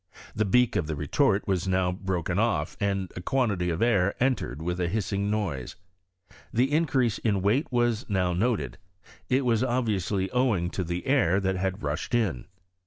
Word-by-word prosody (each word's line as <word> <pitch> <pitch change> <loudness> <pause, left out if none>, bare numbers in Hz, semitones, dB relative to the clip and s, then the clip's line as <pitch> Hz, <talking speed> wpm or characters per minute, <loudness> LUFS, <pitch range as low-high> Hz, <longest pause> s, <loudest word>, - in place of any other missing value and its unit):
The 110 - +1
beak 125 +4 +3
of 80 - 0
the 80 - -2
retort 100 - +1
was 95 -2 0
now 95 -1 +1
broken 90 -1 -2
off; 105 -9 0
and 100 -2 -1
a 90 - -5
quantity 100 -5 0
of 85 +5 0
air 100 -5 +2
entered 130 - 0
with 90 +2 -3
a 90 - +1
hissing 100 +1 -1
noise. 95 - -2 0.8
The 125 +4 +1
increase 135 -8 +2
of 100 -4 +1
weight 115 +10 +2
was 120 -2 0
now 90 -3 +1
noted: 90 - -1 0.5
it 130 +1 +2
was 115 -1 +2
ob 125 0 0
viously 95 -1 0
owing 110 -9 +1
to 95 - -2
the 85 +1 -4
air 115 - +3
that 95 0 0
had 95 0 -2
rushed 75 +10 -2
in. 95 - 0
100 Hz, 175 wpm, -27 LUFS, 90-120 Hz, 0.8 s, beak